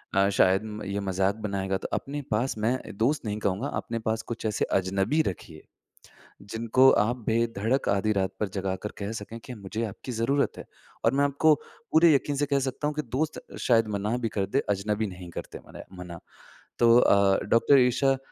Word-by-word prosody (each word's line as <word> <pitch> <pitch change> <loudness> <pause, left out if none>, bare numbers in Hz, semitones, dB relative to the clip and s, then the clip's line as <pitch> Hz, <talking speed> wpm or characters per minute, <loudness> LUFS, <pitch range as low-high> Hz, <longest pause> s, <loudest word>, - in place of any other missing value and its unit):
अ, 100 0 +4
शायद 95 0 +3
म 105 0 -7
ये 100 +1 -2
मज़ाक 95 +1 0
बनाएगा 100 -3 -2
तो - - -6
अपने 145 +1 -3
पास 115 +2 0
मैं 115 +4 +1 0.2
दोस्त 130 +5 +1
नहीं 105 0 -2
कहूँगा, 100 +7 -1
अपने 115 -5 -4
पास 110 0 -1
कुछ 120 0 -7
ऐसे 105 -2 0
अजनबी 95 - +1
रखिए, 80 -2 -6 0.8
जिनको 115 +5 +3
आप 120 +4 +2
बेधड़क 115 +2 0
आधी 100 +2 +1
रात 95 -1 0
पर 105 - 0
जगाकर 95 +1 -3
कह 100 +1 -4
सकें 110 +1 -7
कि 125 - -7
मुझे 105 +2 -5
आपकी 110 +5 -7
जरूरत 125 +5 0
है। - - -8 0.4
और 115 - +4
मैं 140 +1 +2
आपको 145 +2 +4 0.4
पूरे 160 0 +6
यकीन 140 +1 +1
से 145 - +1
कह 140 -1 +1
सकता 135 +2 -2
हूँ 150 - -3
कि 150 - -1
दोस्त 150 +6 -3 0.2
शायद 115 -3 +3
मना 105 +4 -1
भी 115 -2 -2
कर 100 -3 -1
दे, 100 +8 0
अजनबी 105 +2 0
नहीं 90 -2 -9
करते - - -7
मने - - -10 0.2
मना। 85 -1 -8 0.6
तो 120 0 +6
अ, 100 -3 +4
डॉक्टर 135 +4 +5
ईशा 125 +2 +3
अ, - - -3
110 Hz, 195 wpm, -27 LUFS, 100-130 Hz, 0.8 s, पूरे